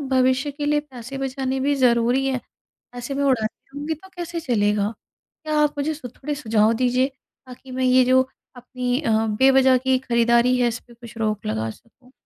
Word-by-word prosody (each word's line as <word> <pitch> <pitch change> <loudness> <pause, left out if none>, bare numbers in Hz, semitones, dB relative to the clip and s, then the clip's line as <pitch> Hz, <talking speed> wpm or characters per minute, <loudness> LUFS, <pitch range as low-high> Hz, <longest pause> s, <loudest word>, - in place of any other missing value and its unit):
भविष्य 260 +2 +2
के 290 +1 -5
लिए 295 0 +2
पैसे 270 -2 -9
बचाने 265 0 -2
भी 285 +2 +1
ज़रूरी 245 0 +2
है। 265 -1 0 0.5
पैसे 245 +2 -6
मैं 280 +1 -1
उड़ाती 230 -5 -1
रहूँगी 295 +2 -2
तो 380 +5 -13
कैसे 345 -1 -4
चलेगा? 210 -6 0 0.5
क्या 310 -1 -1
आप 300 -1 +3
मुझे 295 +2 -1
स 305 - -11
थोड़े 295 +2 -4
सुझाव 220 -4 +2
दीजिए 250 +2 +2 0.4
ताकि 255 +1 -12
मैं 260 0 -2
ये 255 0 +5
जो 260 +1 +5 0.3
अपनी 250 +1 -3
अ, 230 -8 0 0.2
बेवज़ह 265 +4 +4
की 260 +1 +1
खरीदारी 235 0 +3
है 245 - +3
इस 235 +1 -3
पे 240 - -19
कुछ 235 -1 -13
रोक 215 -2 -2
लगा 110 +1 -2
सकूँ। 245 - -16
255 Hz, 185 wpm, -22 LUFS, 235-275 Hz, 0.5 s, ये